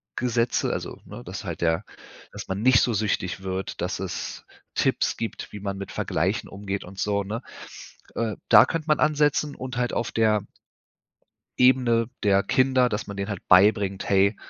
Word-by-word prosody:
Gesetze 120 -1 0
also - - -5
ne, - - -10
dass - - -7
halt - - -5
der 80 +3 +1 0.5
dass - - -8
man 95 +2 -2
nicht 125 -1 +5
so 120 - +1
süchtig 100 -3 -1
wird, 95 0 -4
dass 90 +1 -2
es 95 - -5 0.3
Tipps - - +1
gibt, 115 - -5
wie 105 - -6
man 100 -1 -3
mit 100 0 -7
Vergleichen 95 +8 -1
umgeht 100 0 -5
und 95 +2 -11
so 100 -1 0
ne? 110 +5 -5 0.7
Äh, 110 -3 -1
da - - +9
könnte 165 +3 -4
man 150 - +3
ansetzen 150 -1 +2
und 130 -1 -6
halt 120 0 0
auf 115 - -2
der 110 -2 +2 1.2
Ebene 125 -2 +4
der 100 -1 +4
Kinder, 130 +1 +3
dass 105 0 -3
man 100 - -7
denen 100 +1 -3
halt 100 - -6
beibringt: 100 0 +4
„Hey, 100 +1 +3
105 Hz, 175 wpm, -25 LUFS, 95-120 Hz, 1.2 s, da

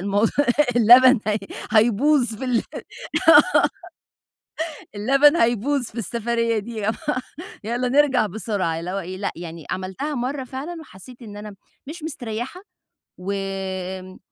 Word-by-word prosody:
الموضوع 200 +3 +1 0.5
اللبن 245 +1 +7
هَيْ 210 0 +1 0.3
هَيْبوظ 240 +4 +3
في 240 +5 -6
ال 245 -3 +1 0.7
آه - - +10 1.5
اللبن 275 +8 +4
هيبوظ 240 +2 +1
في 230 - -7
السفرية 230 +1 -1
دي 215 -1 -5
آه، - - +3 0.7
يالّا 240 +3 -1
نرجع 270 -3 +3
بسرعة 195 -5 -2
اللي 175 +2 -5
هو 195 - -2
إيه 185 +1 -7
لأ، 200 - -2
يعني 165 -2 -8
عملتها 190 +11 -4
مرة 260 +2 -3
فعلًا 285 +7 -7
وحسيت 245 - -14
إن 205 -3 -10
أنا 210 -1 -9 0.3
مش 315 +1 -8
مستريحة 245 +1 -5 0.6
وآمم 190 -1 -5
225 Hz, 125 wpm, -22 LUFS, 195-260 Hz, 1.5 s, آه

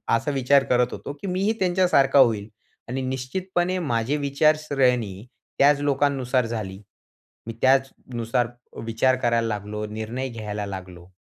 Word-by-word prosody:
असा 115 +6 -1
विचार 135 0 +3
करत 125 0 +2
होतो, - - -6
की - - -5
मी 185 0 -1
ही, 215 +2 +2
त्यांच्यासारखा 175 -7 +3
होईल 110 -5 +3 0.4
आणि 130 +2 -2
निश्चितपणे 175 +8 -2
माझी 125 -3 0
विचारसरणी 135 -8 +1 0.3
त्याच 145 +1 +5
लोकांनुसार 135 -3 +1
झाली. 105 -4 -5 0.7
मी 115 - -4
त्याचनुसार 125 -3 +1 0.4
विचार 115 +3 +2
करायला 115 -2 +1
लागलो, 105 0 -4
निर्णय 110 +5 -4
घ्यायला 105 -3 -5
लागलो. 90 -2 -9
130 Hz, 130 wpm, -24 LUFS, 115-140 Hz, 0.7 s, त्याच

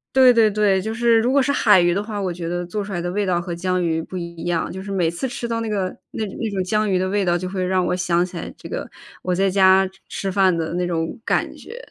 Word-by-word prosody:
对 255 -2 +7
对 225 -2 +5
对， 200 -2 +2
就 220 - -3
是 230 0 +3
如 245 +3 +1
果 280 - +4
是 275 +1 +2
海 210 -8 +5
鱼 175 0 +3
的 200 - -1
话， 210 -1 -5
我 185 -3 -2
觉 170 -1 -5
得 175 0 -2
做 205 +4 -3
出 200 - -8
来 175 - -2
的 175 +1 -3
味 205 +1 -1
道 175 -2 +2
和 175 0 -5
江 185 +1 -1
鱼 160 -1 0
不 185 +3 -7
一 170 -1 -7
样， 170 -2 -1
就 190 - -6
是 200 - -7
每 180 -4 +1
次 170 +10 -3
吃 245 -2 -5
到 230 0 -2
那 225 - -3
个 195 -3 -1 0.2
那 220 - -3
那 215 +2 -4
种 195 -2 -2
江 215 +3 0
鱼 185 - +2
的 185 +1 0
味 200 +1 0
道， 175 -1 +2
就 185 +1 -4
会 185 0 -3
让 185 0 +1
我 180 - 0
想 175 -1 +1
起 180 0 -11
来 165 - -5
这 - - -10
个 - - -5 0.3
我 180 -1 -1
在 195 +1 +2
家 190 0 +5 0.2
吃 195 -1 -3
饭 190 -2 +3
的 165 0 -3
那 180 0 -1
种 165 +3 -2
感 - - 0
觉。 470 - -11
190 Hz, 310 characters per minute, -21 LUFS, 175-210 Hz, 0.3 s, 对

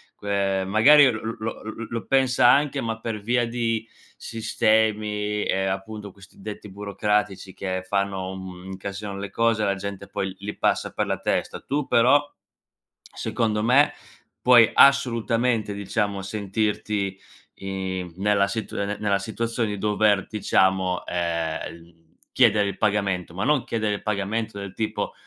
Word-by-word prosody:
que 100 -1 -1
magari 140 +9 +7
l 115 - -1
l 110 +1 -4
lo 110 +1 -5
l 110 - -6
l 110 - -7
lo 115 -4 -4
pensa 130 -2 +3
anche 145 +1 +3
ma 115 -1 -3
per 110 -2 -4
via 120 +3 +1
di 115 -1 -2 0.3
sistemi 105 -2 0
e 95 0 0
appunto 100 +2 -4
questi 95 0 -18
detti 105 0 -7
burocratici 100 -1 -2
che 95 -1 -3
fanno, 100 -1 -1
un 95 - -7
mhmm, 90 0 -10
incasinano 100 +1 -6
le 100 0 -6
cose, 115 -2 +1
la 100 -1 +1
gente 100 0 -6
poi 95 - -3
l 95 - -10
li 105 +1 -5
passa - - 0
per - - -2
la - - -1
testa. - - -1
Tu 145 +1 -2
però, 130 +5 +5 0.8
secondo 110 -2 -2
me, 130 +6 +5 0.5
puoi 120 -3 +7
assolutamente, 120 -4 +3
diciamo, 100 0 -2
sentirti, 105 0 -2 0.4
i 95 -2 -4
nella 100 0 +2
situ 110 +1 -4
nella 100 0 0
situazione 115 +2 -2
di 105 - -3
dover, 105 0 +2
diciamo, 95 -3 +1
ehm, 85 -2 -2
l 85 0 -20 0.3
chiedere 110 -5 +4
il 100 -1 -4
pagamento, 100 -4 0
ma 95 +4 -2
non 150 -2 +2
chiedere 110 -2 -1
il 100 - -4
pagamento 105 +1 -2
del 100 -1 -7
tipo: 110 +1 -3
105 Hz, 150 wpm, -24 LUFS, 95-115 Hz, 0.8 s, magari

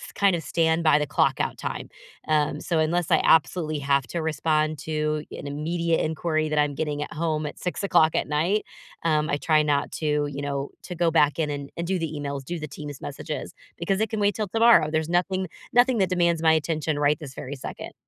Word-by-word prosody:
kind 200 -2 +3
of 165 - -4
stand 165 +1 +1
by 155 -2 +5
the 150 - -1
clock-out - - +1
time. - - -5 0.4
Um, 150 -1 +1
so 170 - -1
unless 165 +2 +1
I - - +5
absolutely 155 -1 +3
have 140 -1 +1
to 170 +7 -3
respond 155 0 0
to 155 -1 -2
an - - -7
immediate 165 +3 -1
inquiry 155 0 -1
that 150 -1 +1
I'm 145 -1 +1
getting 150 0 -2
at - - -9
home 155 -1 -1
at 145 - -8
6:00 180 -3 +2
at - - 0
night, 170 +8 +1 0.4
um, 155 -2 +1
I 145 - +1
try 155 0 +3
not 145 -1 0
to, 150 -1 +1
you 140 0 -5
know, 140 -1 -3
to 180 - -6
go 170 0 +2
back 150 -1 +3
in 155 -2 0
and 140 -1 -5
and 170 0 -3
do 190 - +1
the 165 -2 -3
emails, 140 -1 -4
do 170 +5 -5
the 155 - -5
Teams 145 -1 -8
messages 145 +2 -6 0.2
because 190 +3 -1
it 220 - +1
can 220 - -2
wait 205 -1 +2
till 215 -2 -2
tomorrow. 225 -6 +5
There's 160 0 0
nothing 185 +2 0 0.3
nothing 245 0 +4
that 190 -2 +2
demands 170 -2 +2
my 160 -1 +6
attention 155 -1 -1
right 145 +1 +3
this 140 -4 -9
very 135 +2 -6
second. 135 - -8
155 Hz, 215 wpm, -25 LUFS, 150-170 Hz, 0.4 s, my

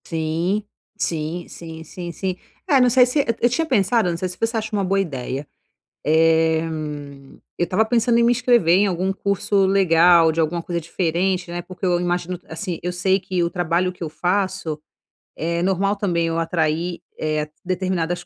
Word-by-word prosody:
Sim, 165 +5 -1 0.3
sim, 165 -1 -3
sim, 160 -1 -9
sim, 175 +2 -7
sim. 185 +2 -3 0.3
É, 280 -6 +5
não 250 - +5
sei 250 +1 +6
se 250 +4 0
Eh, - - -4 0.2
eu 240 - +4
tinha 325 +7 0
pensado, 220 - +2
não 170 - -2
sei 185 +2 -2
se 180 - -9
você 225 0 0
acha 220 +1 -3
uma 200 -1 +1
boa 195 +1 +1
ideia, 140 -5 -3 0.6
eh, 160 +1 +4 1.0
eu - - +1
estava 185 +6 +2
pensando 235 +1 +2
em 235 - +4
me 235 - +4
inscrever 235 -8 +4
em 205 - +3
algum 185 +1 0
curso 200 0 +1
legal, 175 -3 +5
de 160 - -3
alguma 165 +2 0
coisa 170 -1 -2
diferente, 180 +2 -1
né, 175 0 -3
porque 185 +2 -7
eu 175 -1 +2
imagino, 175 0 -2
assim, 165 +2 -4
eu 180 - -1
sei 190 +2 +1
que 185 -2 -1
o 170 - 0
trabalho 175 +1 0
que 180 - -9
eu 160 - -3
faço 185 -2 -1 0.6
é 170 +1 -2
normal 195 +2 +1
também 175 -5 0
eu 165 0 -1
atrair 165 +1 -1 0.6
determinadas 175 -1 -2
180 Hz, 180 wpm, -21 LUFS, 165-195 Hz, 1.0 s, sei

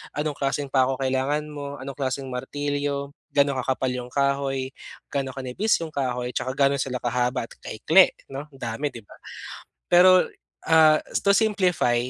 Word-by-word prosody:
anong 150 0 -2
klaseng 140 +1 -1
pa 130 -2 +3
'ko 135 - -1
kailangan 135 +3 0
mo, 145 -1 -7
anong 135 +1 -7
klaseng 135 0 -2
martilyo, 140 +2 -3 0.2
gaano 140 -1 +2
kakapal 130 0 -1
yung 125 -1 -5
kahoy, 140 -1 0 0.4
gaano 135 -2 -2
kanipis 135 - 0
yung 160 - -6
kahoy, 125 -3 -2
tsaka 130 - -1
gaano 140 0 +3
sila 130 -1 -2
kahaba 125 0 -1
at - - -41
kaikli 160 - +4 0.2
no. 140 +2 -6
Dami 135 +1 -4
di 120 - -9
ba? - - -16 0.7
Pero, 185 +1 +7 0.5
ah, 160 -1 +6 0.2
to 200 - +5
simplify, 185 - +2
140 Hz, 155 wpm, -24 LUFS, 130-145 Hz, 0.7 s, Pero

